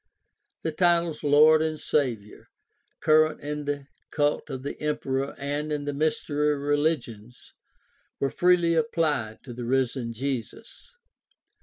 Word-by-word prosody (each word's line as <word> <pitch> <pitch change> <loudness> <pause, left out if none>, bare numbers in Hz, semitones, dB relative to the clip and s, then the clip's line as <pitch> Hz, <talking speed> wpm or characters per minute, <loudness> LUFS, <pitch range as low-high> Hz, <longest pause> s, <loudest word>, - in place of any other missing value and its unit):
The 160 - -1
titles 170 -1 +1
"Lord" 155 +2 +6
and 155 -1 -2
"Savior," 115 -8 -2 0.5
current 155 0 +4
in 150 0 -4
the 145 -1 -3 0.2
cult 145 0 0
of 130 -2 -6
the 140 - -6
emperor 135 -3 -2
and 145 +2 -3
in 145 -1 -2
the 145 - -2
mystery 150 0 0
religions, 140 -6 -2 0.7
were 135 - 0
freely 175 -1 +3
applied 150 -8 0
to 125 - -9
the 120 +1 -6
risen 125 -1 0
Jesus. 130 - -6
145 Hz, 125 wpm, -26 LUFS, 130-155 Hz, 0.7 s, Lord